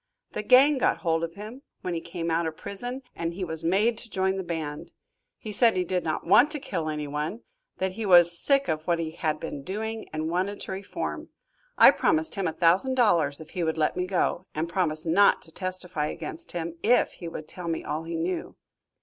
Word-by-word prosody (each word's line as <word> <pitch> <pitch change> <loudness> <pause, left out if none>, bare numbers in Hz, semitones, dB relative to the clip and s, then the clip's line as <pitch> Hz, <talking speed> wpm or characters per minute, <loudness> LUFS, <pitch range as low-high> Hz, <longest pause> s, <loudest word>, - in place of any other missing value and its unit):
The - - -2
gang 265 +5 +6
got - - +2
hold 165 0 +1
of 165 0 -4
him, 215 +6 -9 0.2
when 180 - -3
he 165 - -3
came 170 -1 -4
out 165 0 +1
of 160 -1 -6
prison, 245 +6 -6
and 170 0 -3
he 190 - -4
was 160 -2 -3
made 210 +7 +2
to 235 - -10
join 190 -1 0
the 190 - -2
band. 160 -4 -5 0.5
He 215 - -7
said 225 -1 +3
he 180 - +2
did 180 +1 -1
not 155 - -2
want 245 - +6
to 300 - -3
kill 165 -11 -3
anyone, 150 +7 -3 0.4
that 190 0 -1
he 215 +2 -4
was 175 -2 +7
sick 275 -1 +4
of 155 - -1
what 170 -1 +2
he 165 -1 -3
had 155 -2 -2
been 150 -3 -6
doing, 220 +7 -5
and 155 0 -3
wanted 185 +4 -1
to - - -5
reform. 190 +1 -5 0.5
I - - +9
promised 320 0 +1
him 195 -3 -1
a - - 0
thousand 180 +10 +3
dollars 170 - +3
if 160 - -12
he 180 - -2
would 160 0 -1
let 155 -1 +1
me 180 0 -2
go, 185 0 0
and 155 +2 -1
promised 165 -3 -1
not 190 +5 +5
to 160 - -13
testify 185 -4 -3
against 340 - -6
him, 170 -1 -5
if 245 +2 +3
he 170 - -9
would 155 -2 -7
tell 180 +1 -6
me 165 -1 -2
all 150 +1 -3
he 165 0 -4
knew. 170 +2 -3
175 Hz, 220 wpm, -26 LUFS, 160-205 Hz, 0.5 s, I